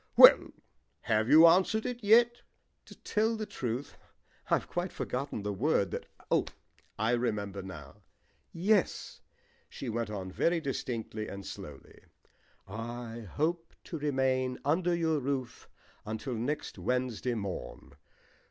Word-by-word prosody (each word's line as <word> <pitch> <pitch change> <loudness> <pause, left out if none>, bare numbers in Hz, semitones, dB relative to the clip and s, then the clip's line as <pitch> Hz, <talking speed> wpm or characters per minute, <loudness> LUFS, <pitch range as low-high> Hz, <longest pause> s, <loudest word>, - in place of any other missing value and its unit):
"Well, - - +10 0.5
have 110 +1 +1
you 160 +2 +9
answered 190 +6 +4
it 245 -2 -4
yet?" 235 +3 +5 0.4
"To - - -13
tell 220 +2 +1
the 215 -1 -3
truth 125 - -4 0.5
I've - - +2
quite 175 +1 -3
forgotten 125 -4 -4
the 105 0 -2
word 100 -3 +1
that - - -5 0.2
Oh, - - +3 0.5
I 110 +2 +1
remember 105 -5 -1
now. 75 -7 -10 0.5
Yes," 195 +3 0 0.5
she 130 - -6
went 115 -1 -2
on 95 -3 -5
very 170 - +1
distinctly 115 -6 -4
and 100 -1 -7
slowly, 70 -2 -10 0.7
"I 115 +2 -6
hope 165 +2 -1
to 165 - -6
remain 130 -3 0
under 170 +4 +2
your 160 -2 +1
roof 130 -3 -4 0.3
until 110 +4 -4
next 125 +7 -3
Wednesday 125 -1 -1
morn. 100 -4 -6
125 Hz, 125 wpm, -31 LUFS, 110-165 Hz, 0.7 s, Well